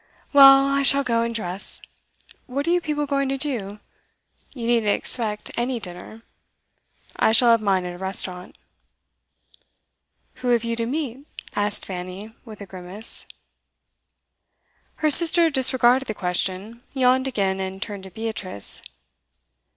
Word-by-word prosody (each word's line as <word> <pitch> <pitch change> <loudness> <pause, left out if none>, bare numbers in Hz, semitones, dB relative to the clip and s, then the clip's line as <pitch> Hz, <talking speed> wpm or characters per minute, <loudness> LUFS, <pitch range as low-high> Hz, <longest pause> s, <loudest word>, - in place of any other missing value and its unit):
'Well, 275 -1 +8
I 275 0 +1
shall 275 0 +5
go 230 -3 0
and 230 0 -3
dress. 190 -3 -3 0.7
What 280 +3 -3
are - - +2
you 355 0 +2
people 300 -2 -2
going 275 -1 -1
to 270 - -2
do? 235 -8 -3 0.7
You 240 -5 -7
needn't 230 -3 +2
expect 215 -2 -3
any 240 +1 -2
dinner. 185 +4 -8 0.9
I - - +3
shall 235 +1 +5
have 230 -1 +3
mine 190 -3 0
at 180 - -5
a 175 - -11
restaurant.' 185 -1 -1 1.8
'Who 250 - -6
have 240 -2 +2
you 230 0 -2
to 230 0 -3
meet?' 275 0 -5 0.3
asked 205 0 -2
Fanny, 185 +3 -7
with 215 -3 -12
a - - -7
grimace. 190 +3 -7 1.7
Her 310 -1 0
sister 335 +1 +7
disregarded 260 -1 +3
the 215 - -4
question, 190 +5 -3
yawned 260 0 +2
again, 195 -6 -1
and 190 0 -5
turned 200 0 -6
to - - -10
Beatrice. 205 - -5
230 Hz, 140 wpm, -22 LUFS, 195-265 Hz, 1.8 s, Well